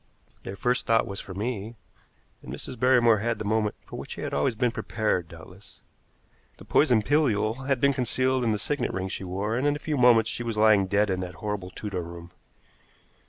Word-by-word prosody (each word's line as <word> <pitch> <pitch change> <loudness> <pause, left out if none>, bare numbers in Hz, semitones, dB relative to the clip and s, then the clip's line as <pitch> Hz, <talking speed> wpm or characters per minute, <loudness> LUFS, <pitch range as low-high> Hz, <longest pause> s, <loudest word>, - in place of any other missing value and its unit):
Their 95 - -7
first 125 +4 0
thought 115 0 +3
was 100 -1 -6
for 95 - -8
me, 110 +1 -4 0.7
and - - -9
Mrs. 125 - -6
Barrymore 120 -3 +4
had 115 +2 -1
the 105 - -5
moment 105 0 0
for - - -8
which - - -7
she - - -8
had - - -4
always 75 +11 +1
been 120 +2 +1
prepared, 105 -7 -1
doubtless. 85 +4 -15 0.8
The - - -13
poison 125 -8 +3
pilule 125 -3 +1
had 135 -3 +1
been 140 +2 +3
concealed 130 0 0
in 115 - +2
a 105 - 0
signet 145 +8 -1
ring 95 0 -3
she 95 - -5
wore, 100 +4 -2
and 130 +4 +1
in 145 - +2
a 145 - -9
few 150 -2 -1
moments 120 -3 +5
she - - -4
was 115 -2 -3
lying 105 -3 +5
dead 105 +1 +2
in 95 - -1
that 90 -1 -6
horrible 105 -3 -4
Tudor 95 -1 -5
room. 85 0 -10
110 Hz, 210 wpm, -26 LUFS, 100-125 Hz, 0.8 s, moments